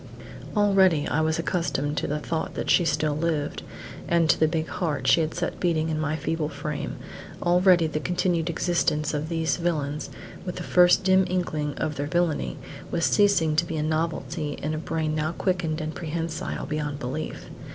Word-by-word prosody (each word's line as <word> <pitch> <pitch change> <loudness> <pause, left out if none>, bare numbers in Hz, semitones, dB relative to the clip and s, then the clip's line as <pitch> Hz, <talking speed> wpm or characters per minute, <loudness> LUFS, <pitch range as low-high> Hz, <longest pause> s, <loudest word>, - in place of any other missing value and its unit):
Already 190 -7 +4
I 160 - +1
was 160 +1 +1
accustomed 145 -4 -1
to - - -1
the 150 - -1
thought 160 +1 -3
that - - -1
she 175 - +4
still 155 -2 +1
lived, 155 -2 -1 0.5
and 170 -1 +3
to - - -1
the 155 - +4
big 160 0 -1
heart 150 -7 -2
she 165 - +5
had 155 0 -2
set - - -3
beating 165 -3 +1
in 155 -1 -1
my 155 0 0
feeble 160 0 -2
frame; 150 0 -4 0.5
already 180 -1 +5
the 155 -1 -2
continued 175 0 0
existence 160 -3 0
of 150 +1 -2
these 165 -1 0
villains, 150 -4 -2 0.3
with 180 - -5
the - - -5
first 180 +2 +5
dim 190 0 +4
inkling 155 -5 -1
of 150 - -2
their 145 +1 -2
villainy, 170 -1 0 0.3
was 170 -1 0
ceasing 200 -7 +3
to 165 - +4
be 165 -2 -4
a 150 - 0
novelty 160 -1 -2
in 150 +2 -3
a 155 - -2
brain 160 -1 -2
now 155 +1 -1
quickened 175 -4 -1
and 155 0 -4
prehensile 165 -1 -4
beyond 150 -1 -3
belief. 145 +4 -5
160 Hz, 185 wpm, -25 LUFS, 150-175 Hz, 0.5 s, she